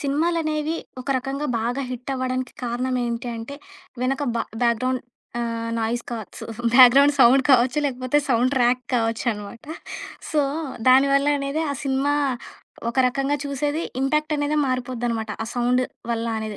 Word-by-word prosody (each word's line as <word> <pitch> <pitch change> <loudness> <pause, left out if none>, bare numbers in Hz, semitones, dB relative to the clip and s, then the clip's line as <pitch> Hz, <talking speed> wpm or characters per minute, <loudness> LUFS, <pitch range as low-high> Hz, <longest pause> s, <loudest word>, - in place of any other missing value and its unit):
సినిమాలనేవి 310 +1 0 0.2
ఒక 255 - -10
రకంగా 275 +3 -3
బాగా 245 +4 -1
హిట్ 250 +2 -5
అవ్వడానికి 255 -1 -2
కారణం 250 +2 -1
ఏంటి 235 +1 -3
అంటే, 225 +5 -7 0.5
వెనక 270 +3 0
బా - - +1 0.2
బ్యాక్‌ 235 -1 +3
గ్రౌండ్ 255 0 0 0.4
ఆహ్, 230 -1 -3
నాయిస్ 235 +2 -1
కావచ్చు 225 -3 -7 0.3
బ్యాక్‌ 250 -1 +9
గ్రౌండ్ 280 +1 +6
సౌండ్ 260 +3 +7
కావచ్చు. 260 +2 +4
లేకపోతే 255 +1 0
సౌండ్ 250 +1 +2
ట్రాక్ 250 0 +3
కావచ్చునమాట. 225 -2 -2 0.7
సో, 305 - +2 0.5
దానివల్ల 275 +2 +5
అనేది 275 +3 -1
ఆ - - -4
సినిమా 275 +1 +1 0.7
ఒక 235 - -3
రకంగా 275 +3 0
చూసేది 290 +2 -2 0.2
ఇంపాక్ట్ 305 +3 +1
అనేదే 290 +1 0
మారిపోద్దనమాట. 245 -3 -2
ఆ - - -3
సౌండ్ 245 +1 +2 0.3
వల్ల 230 0 -1
అనేది. 215 -1 -5
255 Hz, 140 wpm, -23 LUFS, 235-280 Hz, 0.7 s, బ్యాక్‌